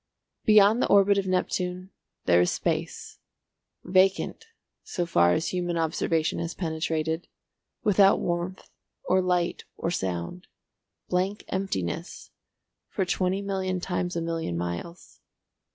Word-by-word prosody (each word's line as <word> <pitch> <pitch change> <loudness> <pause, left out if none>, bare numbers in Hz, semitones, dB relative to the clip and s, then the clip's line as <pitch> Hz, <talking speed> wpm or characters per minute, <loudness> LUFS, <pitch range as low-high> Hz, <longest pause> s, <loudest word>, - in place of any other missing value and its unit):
Beyond 215 +2 +6
the - - +2
orbit 200 0 +5
of 190 - -3
Neptune 185 0 -1 0.3
there 90 0 +5
is 90 - +3
space, - - -3 0.6
vacant 195 - +2 0.4
so 175 - -2
far 85 - +4
as 160 - 0
human 175 -2 -2
observation 160 0 0
has 170 +1 -4
penetrated, 160 -1 -2 0.6
without 200 -1 +5
warmth 175 +2 -3 0.4
or 185 +1 +3
light 180 -1 0
or 170 - -2
sound, 95 - -3 0.6
blank 185 +3 -1
emptiness, 185 - -3 0.6
for 190 - -1
twenty 185 +2 0
million 190 -2 -2
times 180 0 -2
a 170 - -1
million 165 - -2
miles. 90 - -6
180 Hz, 120 wpm, -27 LUFS, 160-190 Hz, 0.6 s, Beyond